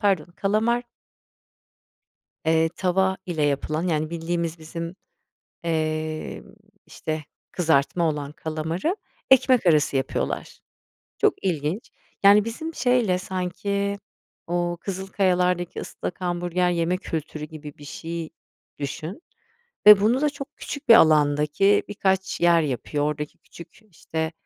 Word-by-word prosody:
pardon 195 -7 +2
kalamar 225 +4 +1 1.6
eee 160 0 +3
tava 190 +2 +1
ile 160 -4 -1
yapılan, 155 +4 0
yani, 155 -1 0
bildiğimiz 170 0 -2
bizim, 165 +2 -6 0.7
emm, 155 -1 -2 0.4
işte, 155 -1 -4 0.3
kızartma 165 0 +2
olan 145 -1 -4
kalamarı 160 - -2 0.4
ekmek 255 -4 +5
arası 150 -4 +3
yapıyorlar. 130 - -3 0.6
Çok - - +3
ilginç. 170 +3 -2 0.3
Yani, 205 +2 +7
bizim 315 +8 -5
şeyle 245 -8 +2
sanki 200 +2 -2 0.5
o 175 0 -1
Kızılkayalar'daki 180 -2 0
ıslak 180 - -6
hamburger 175 0 0
yeme 170 +1 +1
kültürü 155 -4 -5
gibi 150 -2 -10
bir 145 - -12
şey 165 +2 -5 0.5
düşün 155 - -5 0.6
ve 210 -1 +11
bunu 235 +6 +3
da 300 - +3
çok 280 -1 -9
küçük 285 -4 -7
bir 230 - +11
alandaki 150 +4 +4
birkaç 190 -2 -1
yer 170 -1 +5
yapıyor. 145 +1 -2
Oradaki 150 0 -3
küçük, 170 +5 -14
işte, 160 0 -3
175 Hz, 115 wpm, -24 LUFS, 155-195 Hz, 1.6 s, ve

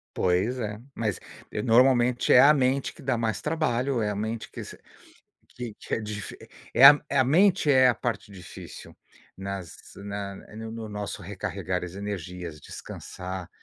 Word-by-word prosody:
Pois 95 +8 +1
é, 105 -2 -4
mas 110 -6 -2 0.4
normalmente 125 0 +4
é 125 - +9
a 145 - +8
mente 135 -1 +1
que - - -16
dá 130 -2 0
mais 110 -3 -1
trabalho. 140 -5 0
É 105 - 0
a 105 - -3
mente 110 +2 -4
que - - -7
se - - -10 0.7
que 120 -3 -7
que - - -8
é - - -2
difi 105 -1 -6 0.4
é 135 - +8
a 145 +1 +11
é 140 - 0
a 130 - +5
mente 175 +3 +4
é 130 -2 +6
a 120 - +1
parte 115 -4 -4
difícil 90 -3 -11 0.4
nas 95 -4 -6 0.2
na 100 -1 -5 0.2
no 110 0 -7
no 115 -1 -6
nosso 105 -1 -5
recarregar 95 -1 -4
as 90 +1 -7
energias, 90 -5 -6
descansar, 90 -1 -8
110 Hz, 165 wpm, -26 LUFS, 100-125 Hz, 0.7 s, a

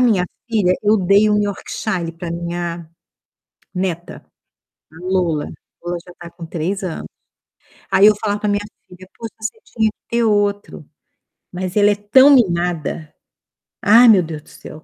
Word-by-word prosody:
minha 215 -8 +3 0.2
filha 205 -6 +2
eu 215 +1 +4
dei 200 +3 +3
um 210 0 +2
Yorkshire 190 -3 -3
pra 165 0 -7
minha 170 -1 -4 0.9
neta, 180 -2 -4 0.7
a - - -17
Lola, 180 -5 0 0.4
Lola 175 0 -3
já 180 - -13
tá 170 -1 -10
com 170 0 -10
3 175 +5 -3
anos. 180 -4 -5 0.9
Aí, 195 +1 +5
eu 215 - +5
falava 205 -1 -1
para 210 - 0
minha 205 0 0 0.3
filha: 185 +1 -14
"Poxa, 230 -1 -7
você 220 - -5
tinha 220 -2 0
que - - -50
ter 235 0 +1
outro". 205 -6 0 0.7
Mas 185 0 -5
ela 205 0 +5
é 205 - +1
tão 225 +7 +5
mimada, 175 - +1 0.7
ai, 230 +4 +7
meu 205 -5 +7
Deus 155 -2 -7
do - - -21
céu, 155 +1 -12
190 Hz, 160 wpm, -19 LUFS, 170-210 Hz, 0.9 s, ai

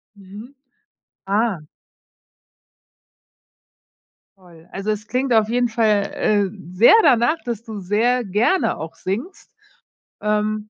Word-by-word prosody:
Mhm, 205 +7 -13 0.7
ah. 205 -1 0 2.8
Toll, 170 -3 -19
also 195 +2 -3
es 210 0 -5
klingt 255 +1 -2
auf 220 -2 +3
jeden 245 +1 0
Fall, 215 -3 +1
äh, 205 -2 +1 0.2
sehr 205 +6 +6
danach, 270 +2 +3
dass 235 -2 -4
du 220 -3 -8
sehr 225 +6 0
gerne 215 - +1
auch 160 +1 -8
singst, 280 - -6 0.7
ähm, 210 0 -1
215 Hz, 105 wpm, -20 LUFS, 200-240 Hz, 2.8 s, sehr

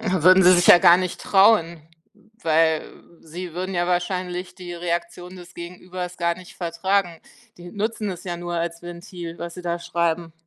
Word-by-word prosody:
Würden 185 -1 +4
sie 180 - +7
sich 175 -1 +3
ja 175 - +9
gar 175 -2 +7
nicht 185 -1 -4
trauen, 190 -5 +3 0.6
weil 160 -1 +2 0.4
sie 170 +2 -8
würden 185 +1 -4
ja 175 0 0
wahrscheinlich 180 0 -2
die 180 -2 -9
Reaktion 175 +1 -4
des 175 -1 -13
Gegenübers 180 +1 -7
gar 170 -1 0
nicht 185 -1 -13
vertragen, 175 0 -1 0.4
die 175 0 -10
nutzen 215 0 -3
es 180 - -8
ja 175 -1 -4
nur 175 0 -5
als 170 0 -3
Ventil, 175 -1 -9
was 170 -1 -6
sie 180 - -9
da 175 0 -2
schreiben. 170 -1 -2
175 Hz, 170 wpm, -22 LUFS, 170-185 Hz, 0.6 s, ja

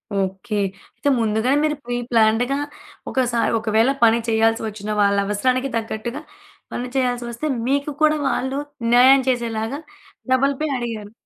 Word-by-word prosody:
Okay. 195 +2 -2 0.4
అయితే 285 - -1
ముందుగానే 225 +5 +1
మీరు 305 -1 +1
ప్రీ 245 0 -3 0.2
ప్లాన్డ్‌గా 230 +4 +3 0.5
ఒకసారి 245 -3 +1
ఒకవేళ 220 +3 +2
పని 230 0 +5
చేయాల్సొచ్చిన 220 -2 0
వాళ్ళవసరానికి 205 +6 +1
తగ్గట్టుగా, 230 +4 -4 0.5
పని 245 - -3
చేయాల్సొస్తే 245 +1 -1 0.2
మీకు 280 +2 0
కూడా 305 0 +4
వాళ్ళు 265 +2 -1 0.3
న్యాయం 260 +2 +7
చేసేలాగా, 235 +1 -2 0.5
డబుల్ 275 +2 +2
పే 310 - +1
అడిగారు. 225 -4 -5
235 Hz, 115 wpm, -21 LUFS, 220-260 Hz, 0.5 s, న్యాయం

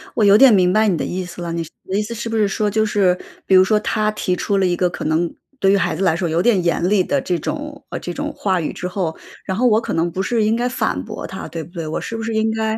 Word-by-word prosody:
我 220 - +2
有 200 +1 +7
点 265 -2 +7
明 180 -2 +4
白 215 0 +3
你 180 -5 +2
的 - - -2
意 185 +1 -3
思 175 0 -9
了。 170 -1 -4
你 170 0 -2
的 185 +4 -6
意 - - +2
思 215 +2 -5
是 230 0 -5
不 225 - -2
是 210 -2 +3
说 210 +1 0
就 220 +1 +1
是 195 -4 +2 0.3
比 190 - +4
如 185 - +8
说 210 +3 +2
他 215 0 0
提 185 -3 -1
出 200 +1 -1
了 195 - +2
一 175 -1 +1
个 180 0 +1
可 - - -6
能 160 +2 0 0.3
对 195 0 +4
于 200 - +4
孩 170 - 0
子 190 - -2
来 170 -4 +3
说 175 +1 -1
有 165 +1 +1
点 200 -3 +3
严 170 +1 +1
厉 200 -2 +3
地 - - 0
这 175 -2 -1
种 295 - -5
呃， - - -4
这 175 - -5
种 - - -4
话 190 -3 0
语 155 - -3
之 180 - -4
后， 180 -4 -3 0.3
然 190 - -2
后 250 - +3
我 220 -2 +4
可 230 - -4
能 170 +1 0
不 190 - -2
是 230 +2 +1
应 215 +1 +2
该 240 +1 0
反 250 - -1
驳 - - -7
他， - - -7
对 165 -1 -6
不 170 - -15
对？ 165 -3 -5
我 155 - -2
是 230 - -5
不 225 - -5
是 225 0 -3
应 220 0 +1
该 220 0 -1
195 Hz, 340 characters per minute, -20 LUFS, 175-220 Hz, 0.3 s, 如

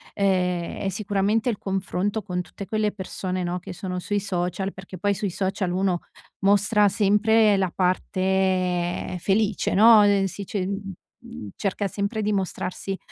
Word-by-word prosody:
ehm, 180 -3 0
è 195 - 0
sicuramente 205 +3 0
il 215 - -1
confronto 195 +2 -2
con 180 -2 -2
tutte 185 +3 -9
quelle 215 0 0
persone, 185 -1 -4
no, 175 +1 -2
che 180 - -9
sono 180 0 -4
sui 205 +3 -1
social, 190 0 -2
perché 190 0 -10
poi 200 +3 +1
sui 200 0 -2
social 190 0 -1
uno 185 -1 +1 0.4
mostra 205 +1 +4
sempre 210 +1 +4
la 190 -2 0
parte 185 -1 0
felice, 205 +2 +1
no, 215 +1 +8
ehm, 200 -1 +3
si 195 +2 -5
dice 190 -1 -3
mhmm, 195 - -8
cerca 200 0 -1
sempre 200 +3 -2
di 210 0 0
mostrarsi 190 0 -3
195 Hz, 150 wpm, -24 LUFS, 185-205 Hz, 0.4 s, no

